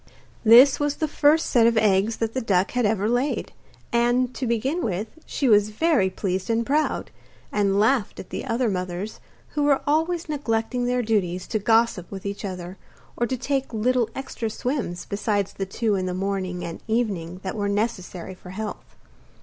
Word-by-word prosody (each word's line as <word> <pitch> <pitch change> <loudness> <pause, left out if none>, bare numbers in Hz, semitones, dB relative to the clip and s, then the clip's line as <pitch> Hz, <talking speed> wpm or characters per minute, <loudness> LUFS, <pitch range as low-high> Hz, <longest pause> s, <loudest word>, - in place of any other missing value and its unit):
This 245 +5 +8
was 290 0 0
the 310 - -1
first 300 +2 +3
set 230 -2 +4
of 230 -1 +2
eggs 210 +1 +3
that 225 -1 -2
the 260 - -1
duck 195 -4 +1
had 245 -3 +1
ever 205 -1 0
laid, 245 +5 -1 0.4
and, 240 +1 +2
to 255 - -3
begin 260 +9 0
with, 210 - -2 0.2
she 275 - -1
was 210 -2 +5
very 235 - +2
pleased 185 0 -3
and 230 0 +1
proud, 295 +1 0 0.4
and 200 -1 +2
laughed 220 0 +2
at - - -9
the - - -4
other 245 -1 0
mothers, 185 +1 -3 0.3
who 295 - -2
were 285 -1 +3
always 325 +3 +1
neglecting 245 -4 -1
their 245 0 +1
duties 185 -5 0
to 215 - 0
gossip 225 -3 +2
with 195 -1 -8
each 200 +1 -4
other 185 -1 -6 0.4
or 240 - 0
to 260 - -2
take 270 +1 -2
little 240 +1 +1
extra 250 -4 -4
swims 245 -7 -3
besides 200 -1 -1
the 195 - -4
two 215 +2 0
in 185 -2 -1
the 180 - -2
morning 190 -2 -2
and 165 - -7
evening 195 -7 -1
that 190 - -4
were 205 -2 -1
necessary 195 -4 -2
for 185 0 -13
health. 210 +3 -7
220 Hz, 180 wpm, -24 LUFS, 195-250 Hz, 0.4 s, This